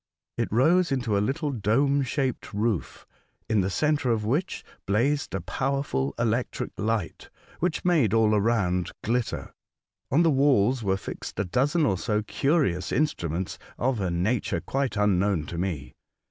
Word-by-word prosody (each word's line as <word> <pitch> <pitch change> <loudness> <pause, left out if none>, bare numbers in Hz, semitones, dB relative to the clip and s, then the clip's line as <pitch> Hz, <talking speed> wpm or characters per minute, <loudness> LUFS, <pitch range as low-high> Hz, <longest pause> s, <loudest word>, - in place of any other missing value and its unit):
It - - -2
rose 165 - +3
into 125 -6 0
a 100 - +2
little 145 +7 -1
dome 135 +5 +2
shaped 130 -4 -2
roof, 105 -3 -2 0.4
in 110 -2 +2
the 95 - 0
centre 150 +4 +1
of 110 -2 +1
which 150 - -1 0.2
blazed 120 +2 +1
a 95 - -2
powerful 95 - -1
electric 120 +1 -1
light, 110 -3 -2 0.3
which 180 +1 -1
made 155 - +3
all 110 -1 +3
around 100 -5 +1
glitter. 120 +1 -2 0.6
On 155 +7 +4
the 165 - +4
walls 130 -3 +3
were 95 -2 +1
fixed - - -7
a 100 - +1
dozen 145 - +1
or 95 -8 +1
so 105 -2 0
curious 105 - 0
instruments 90 - -1 0.2
of 125 -3 0
a 95 - 0
nature 90 +8 0
quite 135 -4 -2
unknown 100 -4 +2
to 85 - -5
me. 85 -7 -3
115 Hz, 150 wpm, -26 LUFS, 100-140 Hz, 0.6 s, On